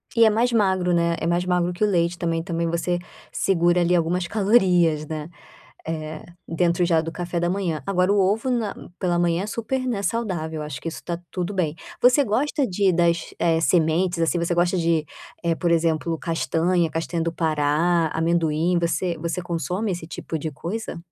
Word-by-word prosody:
E 230 - +6
é 220 - +6
mais 235 +4 +1
magro, 190 -5 +2
né, 170 0 +2
é 160 - -2
mais 175 +1 +1
magro 180 -1 +1
que 175 - -2
o 210 - +4
leite 175 -2 +1
também 165 -1 -1
também 170 0 -2
você 175 +1 -1 0.3
segura 175 -1 +2
ali 175 +1 +3
algumas 175 +1 0
calorias, 180 -7 +3
né, 155 +1 -5 0.6
eh, 155 -1 -5 0.2
dentro 170 +1 +1
já 165 -2 +3
do 165 +1 -3
café 175 0 -3
da 175 0 0
manhã. 175 -6 -1
Agora 185 0 +2
o 205 - +3
ovo 210 +7 +1
na 230 -5 -1 0.2
pela 175 -2 +1
manhã 175 +1 +1
é - - -5
super, 245 +4 -2
né, 220 -5 -1
saudável, 175 -9 -2
acho 150 -4 -6
que 165 - -3
isso 165 - -8
está 170 -1 -4
tudo 180 +2 -3
bem. 165 -5 -1 0.3
Você 250 +4 +5
gosta 270 +6 0
de 195 0 +2
das 170 -1 +1 0.3
sementes, 170 +1 +2
assim, 165 +1 +1
você 170 +1 0
gosta 175 +2 +2
de, 165 -2 +1 0.6
por 175 - +2
exemplo 165 0 +1
castanha, 165 +1 0
castanha 165 +1 -2
do 165 - -1
Pará, 160 +1 +1
amendoim, 165 +1 +1
você 170 0 -1
você 170 +3 -3
consome 180 +4 -2
esse 170 -2 -5
tipo 160 0 -5
de 155 +1 -4
coisa. 200 +10 -5
175 Hz, 185 wpm, -23 LUFS, 165-185 Hz, 0.6 s, E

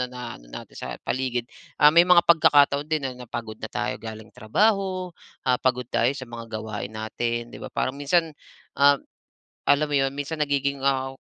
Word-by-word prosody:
na 125 - -1
na 125 -1 -7
ano - - -18
natin - - -10
sa - - -7 0.2
paligid. 125 -2 -2 0.3
Ah, 150 +1 +7
may 170 - +9
mga 175 -1 +5
pagkakataon 145 -3 +4
din 155 -3 0
na 130 - -4
napagod 120 -3 -7
na - - -4
tayo - - -2
galing 110 -1 -8
trabaho, 185 - 0 0.3
ah, 125 -1 +4
pagod 125 -1 +1
tayo 120 +3 +2
sa 130 - -6
mga 115 -1 -9
gawain 110 -1 -5
natin, 115 +2 -3
'di - - -10
ba, - - -6
parang 130 - -1
minsan, 155 +3 +1 0.4
um, 140 0 +5 0.7
alam 145 +2 +4
mo 145 - -3
'yon, 135 0 +2
minsan 150 +2 -4
nagiging, 140 -1 0
ah, 135 -1 0
135 Hz, 185 wpm, -25 LUFS, 120-150 Hz, 0.7 s, may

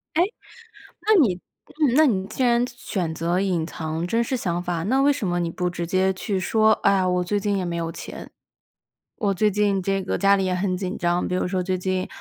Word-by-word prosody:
诶， 335 - +5 0.8
那 435 - +6
你 185 -9 +2 0.6
那 310 +2 +6
你 195 -9 +1
既 220 +5 -2
然 240 0 +3
选 190 -9 -4
择 170 +3 0
隐 180 -4 0
藏 160 0 -4
真 230 +6 +1
实 235 +3 -1
想 175 -7 -2
法， 175 -2 -2
那 260 +8 +2
为 285 +1 +5
什 265 -7 -4
么 175 -1 0
你 170 -1 -1
不 180 +2 -2
直 175 -1 -4
接 190 +1 +2
去 195 +1 -3
说： 220 +4 +3
“哎 200 - +5
呀， 185 -1 +1
我 180 0 +1
最 205 +3 -1
近 200 0 0
也 190 - -1
没 175 -1 -3
有 165 -1 -2
钱。 - - -9 0.9
我 200 -2 0
最 210 +3 +2
近 200 -1 +1
这 195 0 0
个 185 - -2
家 200 0 +4
里 195 - 0
也 185 - 0
很 185 0 -1
紧 185 0 -4
张。” 175 +1 0
比 - - -2
如 185 - 0
说， 185 0 -1
“最 185 0 -1
近， 185 0 -2
190 Hz, 245 characters per minute, -23 LUFS, 180-210 Hz, 0.9 s, 那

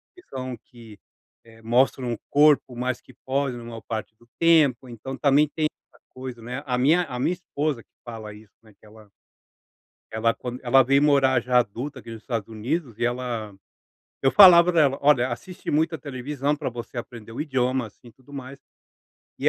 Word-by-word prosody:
que 360 - -16
são 130 -1 -5
que, 115 -3 -16 0.5
eh, 115 0 -18
mostram 120 +1 +1
o - - -5
corpo 145 -4 +4
mais 125 0 -2
que - - -18
pode 135 -2 -1
na 120 - -9
maior 115 -1 -8
parte 110 0 -6
do 120 - -23
tempo, 150 -7 +4
então 130 +3 -8
também 145 +1 +3
tem 155 -1 +1 0.3
essa - - -24
coisa, 130 -2 -8
né. 125 +5 -6
A 125 -2 -1
minha 160 +8 +3
a 125 -6 -6
minha 170 - +1
esposa 150 -7 -3
que - - -54 0.2
fala 110 -3 -8
isso, 105 -1 -17
né, 110 -2 -20
que - - -21
ela 105 -1 -17 1.0
ela 115 +1 +1
quand 125 0 -6
ela 130 +2 +5
veio 140 +3 +3
morar 135 -4 +4
já 125 +1 +2
adulta 125 +5 -3
aqui 115 - -12
nos 115 -1 -8
Estados 115 -4 -4
Unidos 120 +2 -4
e 120 - -1
ela 120 -4 -3 0.7
eu 135 - +3
falava 180 -3 +8
para 165 -2 +4
ela: 140 -2 +2
"olha, 130 -3 +4
assisti 180 +9 -6
muita 160 +2 +1
televisão 140 +1 -3
para 150 -3 -4
você 120 0 -8
aprender 115 -2 -8
o 120 - -4
idioma, 130 -4 -1
assim, 115 +3 -19
e - - -18
tudo 130 +4 -21
mais". 135 0 -8 0.8
E - - +2
125 Hz, 195 wpm, -24 LUFS, 115-140 Hz, 1.0 s, falava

